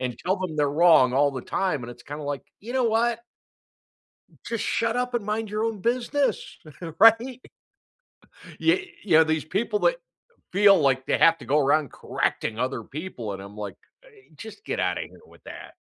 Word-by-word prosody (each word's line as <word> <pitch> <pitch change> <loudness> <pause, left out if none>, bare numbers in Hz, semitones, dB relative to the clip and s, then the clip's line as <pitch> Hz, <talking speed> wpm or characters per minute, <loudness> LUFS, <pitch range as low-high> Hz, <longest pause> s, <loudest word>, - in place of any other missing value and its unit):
and 125 -2 -4
tell 190 +2 -1
them 180 -4 -4
they're 145 -1 +1
wrong 155 -5 +5
all 140 +1 +3
the 130 -2 -6
time, 180 -6 -2
and 120 - -7
it's 120 - -13
kinda 145 +1 -8
like, 145 -1 -4 0.2
"You 235 +5 -8
know 255 -2 +2
what?" 230 +1 +1 1.2
"Just 230 -1 -3
shut 230 +1 0
up 250 0 -2
and 230 -4 -1
mind 215 0 -3
your 215 +1 -1
own 225 -4 -3
business," 255 +5 -1 0.4
right? 230 +4 +5 1.2
Ye 350 +1 +1
yeah, 160 -4 +5
these 160 -1 -1
people 210 +4 -1
that - - +2 0.5
feel 200 -1 +5
like 135 -2 +1
they - - +1
have 165 0 +5
to - - -11
go 145 +5 +2
around 145 -1 +2
correcting 110 0 -3
other 130 -3 -2
people, 135 - -7
and 95 - -7
I'm 100 +1 -11
like, 100 -2 -6 0.3
I - - -19 0.3
"Just 220 - -11
get - - -3
out - - 0
of - - -4
here - - -16
with - - -21
that." - - -10
180 Hz, 190 wpm, -25 LUFS, 140-230 Hz, 1.2 s, wrong